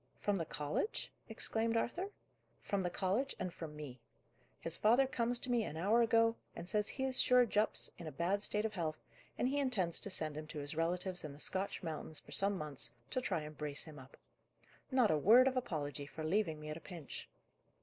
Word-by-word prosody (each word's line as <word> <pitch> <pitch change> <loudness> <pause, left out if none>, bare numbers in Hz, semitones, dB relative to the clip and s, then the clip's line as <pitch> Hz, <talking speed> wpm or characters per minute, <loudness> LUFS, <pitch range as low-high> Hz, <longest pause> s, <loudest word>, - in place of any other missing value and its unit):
"From 205 -2 0
the 165 - -1
college?" 150 - -2 0.2
exclaimed 225 +1 0
Arthur. 350 - -1 0.5
"From 200 -1 0
the 180 - 0
college, 200 +10 0
and 185 -2 -3
from 155 -3 -7
me. 140 -5 -7 0.6
His 165 0 -1
father 240 +5 +5
comes 245 -2 0
to 250 - -3
me, 235 -2 +3
an 155 -5 -5
hour 210 +8 +4
ago, 230 0 +4 0.2
and 175 - -6
says 210 +2 +1
he 265 - -3
is 260 -1 +4
sure 250 -1 +6
Jupp's 210 -1 +2
in 170 - -6
a - - -4
bad 175 +8 0
state 210 +1 +1
of 220 - -1
health, 160 -5 -3 0.3
and - - +2
he 285 +2 +1
intends 210 -12 +1
to - - -4
send 155 -5 -1
him 155 0 -5
to 155 - -7
his 145 +1 -4
relatives 180 +3 -1
in 150 -2 -6
the 145 - -13
Scotch 190 +5 -2
mountains 155 -1 -3
for - - -15
some 200 0 +2
months, 140 -8 -4 0.2
to 255 - 0
try 205 -10 0
and 150 0 -8
brace 150 -1 -3
him 155 -3 -10
up. 130 +1 -14 0.7
Not 255 -5 +4
a 155 - +3
word 235 - +7
of 265 - +1
apology, 145 - -2
for 155 +2 -7
leaving 165 -2 +1
me 150 0 -7
at 155 - -4
a - - -11
pinch." 170 -6 -8
185 Hz, 215 wpm, -36 LUFS, 155-230 Hz, 0.7 s, word